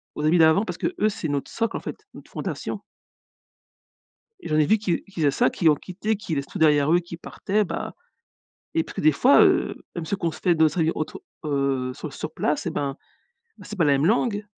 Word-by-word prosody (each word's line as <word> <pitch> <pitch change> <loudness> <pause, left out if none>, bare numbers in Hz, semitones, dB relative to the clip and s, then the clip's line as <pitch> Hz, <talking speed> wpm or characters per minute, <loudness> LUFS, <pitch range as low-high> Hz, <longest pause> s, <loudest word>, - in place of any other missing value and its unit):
aux 150 - -2
amis 165 +3 +4
d'avant, 160 +6 +5
parce 180 -4 -5
qu'eux, 215 - 0
c'est 175 -5 -4
notre 140 -1 -3
socle, 230 0 -1
en - - -5
fait, 425 -1 -8
une - - -12
fondation. - - -5 1.6
Et - - -8
j'en 155 - +1
ai 150 - +4
vu 220 - +4
qui 190 -5 -1
qui 195 -4 -9
faisaient 145 -2 +4
ça, - - +2
qui 165 - +2
ont 150 - +6
quitté, 200 +7 -3
qui 175 -6 -4
laissent 140 -1 -2
tout - - -7
derrière 150 -1 +4
eux, 175 - +6
qui 170 -1 -9
partaient, 210 +4 -1
bah - - -5 0.8
et 165 - +2
puis - - -6
des 155 0 +5
fois, 255 - +5
heu, - - +3 0.2
même 170 - -4
ceux 195 +5 -2
qu'on 170 -3 -2
se 155 - -11
fait 175 - +3
d'autres 160 +2 +3
amis 160 - +3
autour, 155 - -5 0.2
heu, 140 -3 0
sur - - -7
sur - - -6
place, - - -1
eh - - 0
ben, 140 -1 -3 0.6
bah, - - -13
c'est 210 - -7
pas 170 - +3
la 145 - +4
même 140 +3 +2
langue, 215 -1 +1
165 Hz, 230 wpm, -24 LUFS, 150-200 Hz, 1.6 s, ont